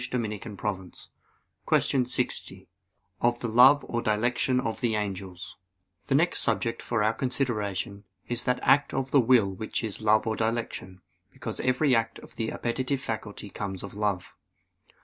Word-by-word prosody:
_______________________ 105 Hz, -6 st, -4 dB, 0.6 s
QUESTION 130 Hz, -2 st, +3 dB
60 -, -, -2 dB, 0.5 s
OF 120 Hz, 0 st, +2 dB
THE 120 Hz, -, -3 dB
LOVE 130 Hz, +5 st, +6 dB
OR 120 Hz, -, -1 dB
DILECTION 120 Hz, +4 st, +1 dB
OF 115 Hz, -3 st, -3 dB
THE 115 Hz, -3 st, +1 dB
ANGELS 100 Hz, -2 st, -3 dB
(In 90 Hz, +1 st, -9 dB
Five -, -, -10 dB
Articles) 90 Hz, -1 st, -29 dB
The 135 Hz, -, +2 dB
next 170 Hz, +5 st, +3 dB
subject 115 Hz, -2 st, 0 dB
for 115 Hz, -3 st, 0 dB
our 110 Hz, +1 st, +2 dB
consideration 105 Hz, -6 st, -2 dB, 0.2 s
is 120 Hz, 0 st, +3 dB
that 125 Hz, 0 st, +1 dB
act 140 Hz, -1 st, +4 dB
of 135 Hz, 0 st, -2 dB
the 140 Hz, -, +6 dB
will 115 Hz, -5 st, +4 dB
which 110 Hz, +4 st, -3 dB
is 110 Hz, -1 st, -4 dB
love 110 Hz, +1 st, +3 dB
or 110 Hz, -1 st, 0 dB
dilection; 110 Hz, -5 st, -3 dB, 0.3 s
because -, -, -6 dB
every 130 Hz, +2 st, +2 dB
act 115 Hz, -1 st, +1 dB
of -, -, -14 dB
the 115 Hz, -1 st, -2 dB
appetitive 130 Hz, +3 st, -2 dB
faculty 110 Hz, -4 st, -5 dB
comes 95 Hz, -3 st, -5 dB
of 100 Hz, -, -7 dB
love. 100 Hz, -3 st, -2 dB
110 Hz, 165 wpm, -27 LUFS, 100-125 Hz, 0.6 s, LOVE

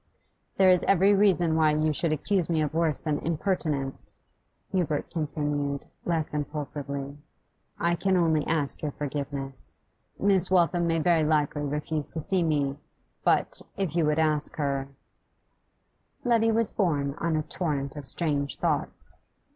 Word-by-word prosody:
'There 190 Hz, -1 st, +6 dB
is 180 Hz, -1 st, +4 dB
every 195 Hz, +2 st, +5 dB
reason 185 Hz, -5 st, +3 dB
why 155 Hz, -1 st, +4 dB
you 155 Hz, 0 st, +1 dB
should 165 Hz, +2 st, 0 dB
accuse 175 Hz, +3 st, 0 dB
me 165 Hz, -2 st, +1 dB
of 150 Hz, -1 st, -1 dB
worse 160 Hz, -2 st, +1 dB
than 150 Hz, -2 st, -1 dB
impertinence,' 155 Hz, -5 st, -1 dB, 0.6 s
Hubert 165 Hz, -6 st, -1 dB
continued, 145 Hz, -3 st, -2 dB, 0.2 s
less 165 Hz, -3 st, 0 dB
impulsively. 145 Hz, -1 st, -4 dB, 0.6 s
'I 170 Hz, 0 st, +2 dB
can 190 Hz, +1 st, +2 dB
only 160 Hz, -3 st, +2 dB
ask 155 Hz, -4 st, +1 dB
your 150 Hz, -3 st, -3 dB
forgiveness. 140 Hz, -2 st, -4 dB, 0.4 s
Miss 195 Hz, -2 st, +3 dB
Waltham 175 Hz, -1 st, +3 dB
may 165 Hz, 0 st, +1 dB
very 165 Hz, 0 st, +3 dB
likely 150 Hz, -1 st, +1 dB
refuse 150 Hz, +1 st, -2 dB
to -, -, -1 dB
see 185 Hz, +4 st, +1 dB
me, 145 Hz, -4 st, 0 dB, 0.4 s
but, -, -, +2 dB, 0.2 s
if 190 Hz, -5 st, -2 dB
you 170 Hz, -, +3 dB
would 150 Hz, 0 st, +1 dB
ask 155 Hz, -2 st, +1 dB
her 140 Hz, -2 st, -1 dB, 0.7 s
' 285 Hz, -, -45 dB
Letty 225 Hz, -2 st, +3 dB
was 225 Hz, -1 st, +1 dB
borne 145 Hz, -8 st, 0 dB
on 165 Hz, -1 st, 0 dB
a 155 Hz, -, 0 dB
torrent 145 Hz, -6 st, -3 dB
of 145 Hz, -3 st, -7 dB
strange 145 Hz, -4 st, -1 dB
thoughts. -, -, -1 dB
155 Hz, 145 wpm, -27 LUFS, 145-175 Hz, 0.7 s, There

